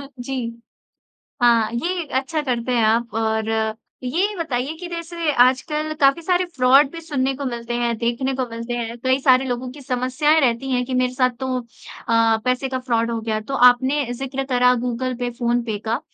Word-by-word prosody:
अह 280 - -9
जी। 270 +1 -4 1.1
हाँ, 235 -2 +4
ये 340 +7 -2
अच्छा 305 +3 -3
करते 250 -2 -2
हैं 235 -2 +2
आप 230 +1 +1
और 220 0 0 0.5
ये 370 +11 0
बताइए 285 -4 -2
कि 355 0 -7
जैसे 335 -2 -3
आजकल 300 +5 +2
काफ़ी 275 +4 +4
सारे 360 +2 +1
फ्रॉड 270 +2 +5
भी 335 - -8
सुनने 270 -4 -1
को 280 0 -5
मिलते 240 -1 -4
हैं 235 -1 0
देखने 240 +3 -1
को 260 -1 -1
मिलते 230 +1 -5
हैं। 235 0 -4
कई 260 +1 +2
सारे 265 -1 +4
लोगों 250 0 -3
की 285 +1 -12
समस्याएँ 260 +5 +1
रहती 255 +1 0
हैं 250 0 +1
कि 260 - -5
मेरे 250 0 +1
साथ 255 -1 +2
तो 260 - -3
अ, 230 -1 -1
पैसे 255 +1 0
का 260 -1 -2
फ्रॉड 235 -2 0
हो 230 - -2
गया। 220 -1 -1
तो 270 +6 -7 0.2
आपने 260 +3 0
ज़िक्र 270 +2 -4
करा 250 0 +4
गूगल 250 +1 -2
पे, 245 0 -3
फ़ोन 240 0 0
पे 220 -3 -3
का। 230 - 0
255 Hz, 195 wpm, -21 LUFS, 235-275 Hz, 1.1 s, फ्रॉड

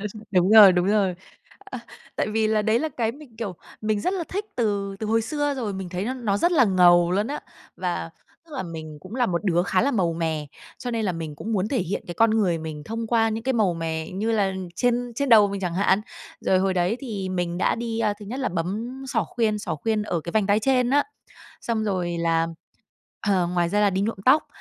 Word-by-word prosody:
Ừ, 210 - -3 0.2
đúng 185 0 +3
rồi, 210 -3 +10
đúng 180 0 +1
rồi. 200 -3 +2 0.6
Ờ, - - -5 0.4
tại - - 0
vì 220 0 +1
là 215 -1 +2
đấy 220 +2 +2
là 315 - -1
cái 230 -5 -2
mình, 275 -5 -15
kiểu, 215 -5 -4 0.3
mình 215 -1 0
rất 365 - 0
là 345 -3 -2
thích 405 +3 -3
từ 200 -4 -1
từ 220 - -4
hồi 225 +1 +2
xưa 290 +4 -1
rồi. 235 -6 -3
Mình 190 -2 -5
thấy 180 +2 -3
nó 255 +4 -2
nó 225 -6 -1
rất 345 - +2
là 275 -7 +5
ngầu 175 -3 +5
luôn 205 +3 +1
á! 285 +4 -4 0.4
Và, 175 -2 -3 0.4
tức 315 - -17
là, 265 - -2
mình 160 -3 -8
cũng 210 - -10
là 250 -1 +2
một 175 0 -2
đứa 175 -3 +2
khá 185 0 +1
là 275 - +2
màu 180 -9 +1
mè, 160 -2 -2 0.3
cho 245 - -4
nên 230 -2 -1
là 185 - 0
mình 160 -3 -5
cũng 225 +9 -5
muốn 200 0 0
thể 265 - 0
hiện 190 +1 -3
cái 175 - -6
con 225 +3 +4
người 195 -7 +2
mình 155 -2 -7
thông 225 +3 -4
qua 225 -1 +2
những 220 +1 -4
cái 265 - +1
màu 205 -7 +2
mè, 160 -1 -3
như 210 +5 -2
là 200 -3 +1 0.2
trên 245 -1 0
trên 280 +3 -1
đầu 215 -4 +7
mình 200 0 -4
chẳng 175 -2 -2
hạn. 195 +1 +3 0.4
Rồi 190 - +2
hồi 190 0 +1
đấy 180 +5 +1
thì 210 -8 -4
mình 175 -2 -2
đã - - +2
đi, 230 -1 -3
a, 210 -2 +1
thứ - - -8
nhất 255 +6 -5
là 260 - 0
bấm 210 +10 -4
xỏ - - 0
khuyên 220 -3 0
xỏ 205 - -3
khuyên 215 +7 -1
ở 175 -6 -2
cái 170 - -7
vành 215 -3 +2
tai 205 +1 +3
trên 250 0 +2
á. 285 +1 +4 0.6
Xong 225 -2 -1
rồi 180 -4 -1
là, 165 0 +1 0.8
ờ, 185 -3 +2
ngoài 175 -1 0
ra 205 +3 +1
là 205 - +4
đi 190 0 -1
nhuộm 220 +1 -1
tóc. 285 +4 +5
205 Hz, 250 wpm, -24 LUFS, 180-230 Hz, 0.8 s, rồi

